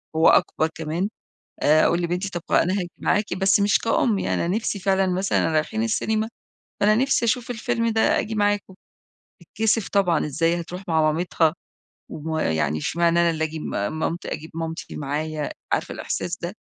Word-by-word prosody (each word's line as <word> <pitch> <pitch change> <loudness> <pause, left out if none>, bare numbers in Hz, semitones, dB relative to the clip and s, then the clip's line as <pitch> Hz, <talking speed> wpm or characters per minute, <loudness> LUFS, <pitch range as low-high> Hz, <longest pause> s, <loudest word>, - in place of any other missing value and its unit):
هو 160 - +6
أكبر 160 - +3
كمان، 165 +5 -2 0.5
آآ، 155 +1 +5
أقول 170 +1 +2
لبنتي: 180 +3 -2
"طب 175 -2 -5
خ - - -10
أنا 185 - +3
هاجي 180 -3 -2
معاكِ، 210 +2 0
بس 195 +1 +3
مش 205 +1 +3
كأم 225 -2 +1
يعني، - - 0
أنا 175 +3 0
نفسي 220 -2 -2
فعلًا، 190 0 +2
مثلًا 190 -2 +1
رايحين 160 +8 0
السينما، 220 0 0 0.5
فأنا 210 +1 +4
نفسي 260 0 +2
أشوف 235 +1 0
الفيلم 230 0 -1
ده، 220 0 +1 0.2
آجي 220 0 -3
معاكم." 205 -2 0 0.7
تتكسِف 220 -1 0
طبعًا، 180 -7 +2
إزاي 165 +4 0
هتروح 180 +3 -7
مع 160 -2 +3
مامتها 165 -1 +1 0.6
ويعني 145 - -1
إشمعنى 170 - +2
أنا 170 0 +4
اللي 160 -1 -1
آجي 160 0 -4
مامت 155 - -3
أجيب 160 +1 -5
مامتي 165 0 -5
معايا! 150 +1 -3 0.2
عارفة - - -1
الإحساس - - -3
ده؟ - - -5
175 Hz, 165 wpm, -23 LUFS, 160-205 Hz, 0.7 s, هو